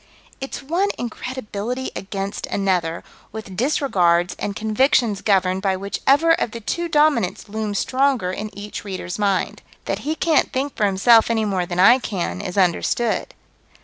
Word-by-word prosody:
It's 270 +1 -6
one 350 +8 0
incredibility 245 0 -5
against 195 0 -4
another, 180 -4 -1 0.3
with 215 -3 -8
disregards 180 - +1
and 200 - -3
convictions 220 -1 +1
governed 190 -2 +2
by 190 -1 0
whichever 275 - +2
of 240 -8 +1
the 230 - -5
two 340 +10 -3
Dominants 295 - +2
looms 210 -1 -3
stronger 260 -8 +1
in 210 +3 -5
each 205 +1 -7
reader's 190 -2 -5
mind. 200 -2 0 0.2
That - - -2
he 310 +2 -2
can't 320 -1 +2
think 270 +1 -2
for 210 - +2
himself 220 +4 +5
any 225 -1 +1
more 185 -4 -1
than 175 0 -3
I 240 +7 +7
can 175 - -3
is 180 - -6
understood. 195 +5 0
210 Hz, 150 wpm, -21 LUFS, 190-260 Hz, 0.3 s, I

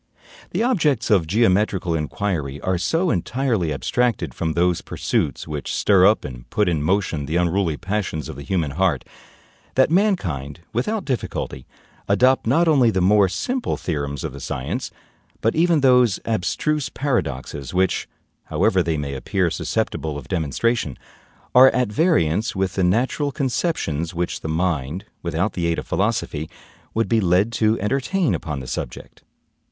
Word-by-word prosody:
The - - -1
objects 155 - +1
of 90 -6 +4
geometrical 95 -3 +2
inquiry 75 -3 -2
are 95 -1 0
so 165 - +1
entirely 110 - 0
abstracted 120 - 0
from 80 -1 -2
those 90 0 +1
pursuits 70 0 -2
which 75 -2 -4
stir 95 -2 +4
up 105 - +2
and - - -9
put 105 -2 +1
in 80 -4 +1
motion 80 -3 0
the 80 - -2
unruly 85 -2 +1
passions 95 -7 -3
of - - -7
the 70 - -8
human 80 0 -1
heart, 85 -4 0 0.7
that 130 +3 +4
mankind, 90 - 0
without 200 - -1
difficulty, 115 - -3 0.4
adopt 130 +5 +3
not 165 +8 +3
only 135 -7 +5
the 95 - 0
more 100 +1 +4
simple 245 - -2
theorems 70 -4 -3
of - - -4
the 70 - -8
science, 65 -1 -4 0.5
but 115 - +1
even 165 -2 +3
those 125 -6 +4
abstruse 130 +8 -1
paradoxes 70 - -2
which, 95 +1 +1 0.4
however 95 - +2
they 80 -2 -1
may 70 -2 -3
appear 85 +7 0
susceptible 80 -1 -2
of 70 - -9
demonstration, 85 - -1 0.6
are 130 +1 +9
at 125 -4 +1
variance 110 - +2
with 95 -1 -1
the 95 - 0
natural 125 +10 +1
conceptions 120 - -1
which 85 +1 -2
the - - -5
mind, 80 -1 -1 0.2
without 85 +4 -1
the 85 -2 -1
aid 85 - 0
of - - -4
philosophy, 75 +1 -1 0.5
would 115 0 +1
be 115 -1 +2
led 95 +4 +3
to 110 -1 +1
entertain 135 - 0
upon 75 -4 -3
the - - -8
subject. - - -6
95 Hz, 155 wpm, -22 LUFS, 80-120 Hz, 0.7 s, are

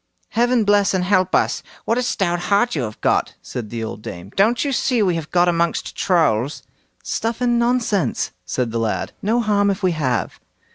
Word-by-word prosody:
"Heaven 240 0 +2
bless 205 -1 +3
and 185 - +1
help 185 -1 +2
us! - - +1 0.2
what 230 +2 +1
a - - +1
stout 190 -8 0
heart 240 +5 +3
you 145 - 0
have 110 -3 -5
got", - - +1
said 115 -4 -6
the 115 0 -4
old 110 -1 -6
dame; 95 -1 -8
"don't 230 +7 +3
you 280 - 0
see 250 -3 +1
we 185 -3 +2
have 165 -2 -4
got 175 0 +3
amongst 170 -1 0
Trolls?" 150 - +1 0.4
"Stuff 230 +1 -2
and 240 -1 +2
nonsense!" 235 - 0
said 115 +6 -2
the 115 - -1
lad; 110 -1 -1
"no 225 +3 +1
harm 205 -2 +2
if 195 0 -2
we 185 - +3
have." 130 - -1
185 Hz, 195 wpm, -20 LUFS, 135-230 Hz, 0.4 s, bless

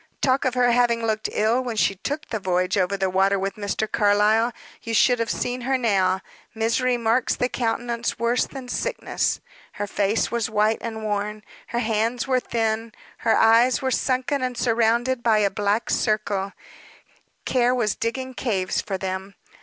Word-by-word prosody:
Talk 265 0 +1
of 255 -1 0
her 245 -1 +3
having 235 -1 +2
looked 220 -1 -1
ill 225 +4 +1
when 240 -3 -4
she 205 - +2
took 290 +11 -5
that 220 -3 -3
voyage 185 -1 0
over 195 0 +1
the 190 0 0
water 195 +2 +2
with 195 +1 -2
Mr. 205 +1 -2
Carlyle; 210 +3 +3 0.3
you 230 -1 -3
should 245 0 +4
have 230 0 -1
seen 250 +1 -2
her 265 +2 +1
now 190 -6 +1 0.3
misery 235 +3 +1
marks 230 +1 +1
the 250 - 0
countenance 235 -1 -2
worse 235 +2 +1
than 265 -2 -9
sickness. - - -2 0.3
Her 205 - -3
face 205 +2 0
was 235 -2 -1
white 215 +1 +2
and 220 -1 -5
worn, 210 0 -3 0.2
her 235 - -4
hands 230 +3 0
were 255 -1 +2
thin, 225 -2 -2 0.3
her 225 - +2
eyes 230 +3 +4
were 260 - 0
sunken 260 +2 0
and 250 -1 -2
surrounded 235 +2 +1
by 225 -2 +3
a 205 -2 +2
black 205 +3 0
circle 205 -3 0 0.9
care 250 -1 +2
was 215 -5 +1
digging 260 +3 -3
caves 200 -8 -1
for 195 - -4
them. 190 +1 -5
225 Hz, 170 wpm, -23 LUFS, 205-245 Hz, 0.9 s, should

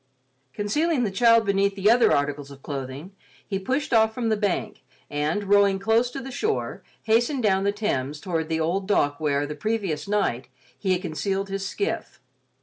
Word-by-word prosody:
Concealing 270 - 0
the 210 - -1
child 230 +2 +4
beneath 200 0 +1
the 195 0 0
other 235 +2 +5
articles 145 0 0
of 140 -1 -13
clothing, 140 +4 -6 0.3
he 195 -2 -3
pushed 260 +7 -2
off 220 -1 +4
from 235 -2 -1
the 220 - +3
bank, 205 -3 -2 0.3
and, 150 +7 -1
rowing 200 -1 +4
close 225 +4 +2
to 275 - -6
the 265 0 -7
shore, 430 - -2 0.2
hastened 240 +4 +2
down 195 -2 +2
the 200 - +3
Thames 150 -9 -2
toward 165 -2 -2
the 160 0 0
old 180 +4 -1
dock 145 -8 +1
where, 145 -2 0
the 150 - -5
previous 195 -2 -2
night, 195 - 0 0.3
he 190 -2 0
had 180 +1 -2
concealed 195 +4 -2
his 195 0 -3
skiff. 405 - -3
195 Hz, 180 wpm, -25 LUFS, 155-225 Hz, 0.3 s, other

